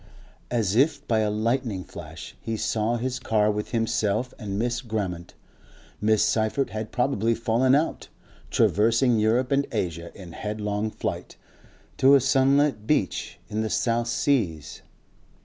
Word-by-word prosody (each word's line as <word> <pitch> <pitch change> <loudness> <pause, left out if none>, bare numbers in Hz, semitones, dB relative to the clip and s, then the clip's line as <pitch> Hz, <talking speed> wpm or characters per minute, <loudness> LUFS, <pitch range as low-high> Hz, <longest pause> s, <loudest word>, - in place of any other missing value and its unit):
As 110 -5 0
if 145 +5 +2
by 110 -2 +2
a 105 -1 +1
lightning 110 -2 -1
flash - - -10
he 115 0 -3
saw 110 +2 0
his 125 +1 -3
car 105 -3 +2
with 105 0 -4
himself 115 0 0
and 100 -4 -4
Miss 120 +2 -1
Grammont 100 -8 -4 0.7
Miss 110 0 +3
Seyffert 110 +5 0
had 110 0 -5
probably 115 -3 +1
fallen 120 +4 +2
out 155 +3 -1 0.4
traversing 115 +3 +3
Europe 120 +5 +2
and 140 0 +2
Asia 85 -6 -3
in 90 -3 -10
headlong 105 +2 -3
flight. - - -5 0.6
To 135 +2 +6
a - - +6
sunlit 135 -3 +2
beach 125 - 0
in 110 +1 -2
the 110 - -2
South 115 +1 0
Seas.... 110 - -1
110 Hz, 140 wpm, -25 LUFS, 105-125 Hz, 0.7 s, To